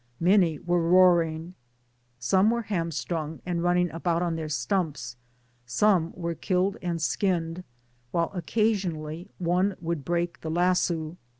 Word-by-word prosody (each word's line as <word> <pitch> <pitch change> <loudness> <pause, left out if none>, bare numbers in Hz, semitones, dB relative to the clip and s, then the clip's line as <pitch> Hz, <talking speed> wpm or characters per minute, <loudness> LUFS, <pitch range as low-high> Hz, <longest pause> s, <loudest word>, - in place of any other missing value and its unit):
8^ 175 - +1
tnany 165 -5 0
were 175 0 +2
roaring, 170 -1 +3 0.6
some 190 - +3
were 235 0 0
hamBtrung, 165 -4 -3
and 175 -1 -1
running 175 -1 +2
about 170 +1 0
on 170 -2 -1
their 160 -1 -4
stumps; 145 -3 -2 0.5
some 170 - +2
were 170 -1 -3
killed 185 +3 0
and 175 -2 -2
skinned^ 170 +1 -1 0.5
while 170 +4 0
occasionally 180 -3 -1
one 180 +2 +1
would 165 -3 -3
break 175 +2 -2
the 160 - -4
lasso. 175 -1 +1
170 Hz, 130 wpm, -27 LUFS, 160-180 Hz, 0.6 s, roaring